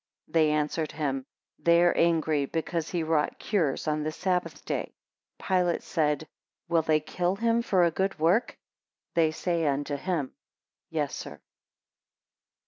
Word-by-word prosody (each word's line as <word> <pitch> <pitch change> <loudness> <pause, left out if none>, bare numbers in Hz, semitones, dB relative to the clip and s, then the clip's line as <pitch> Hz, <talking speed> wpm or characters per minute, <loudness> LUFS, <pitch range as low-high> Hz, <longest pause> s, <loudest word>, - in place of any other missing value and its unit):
17 - - -23
They - - +2
answered 150 +1 -1
him, 135 -3 -2 0.3
They 170 0 +4
are 175 - +4
angry 160 -4 +2
because 165 +1 -2
he 175 -3 -1
wrought 155 -2 +1
cures 160 -9 0
on 155 0 +1
the 155 +1 -2
sabbath 180 +2 -2
day. - - -3 0.4
Pilate 180 -2 +1
said, 150 -1 0 0.4
Will 170 -1 +3
they 155 -1 +2
kill 175 +4 -1
him 230 +2 +2
for 190 -6 +3
a 170 - +3
good 190 +2 -1
work? 170 +9 +2 0.6
They 165 -2 +4
say 165 0 -1
unto 145 +1 -1
him, 155 -4 -2 0.6
Yes, - - -1
Sir. - - -8
160 Hz, 145 wpm, -28 LUFS, 150-175 Hz, 0.6 s, They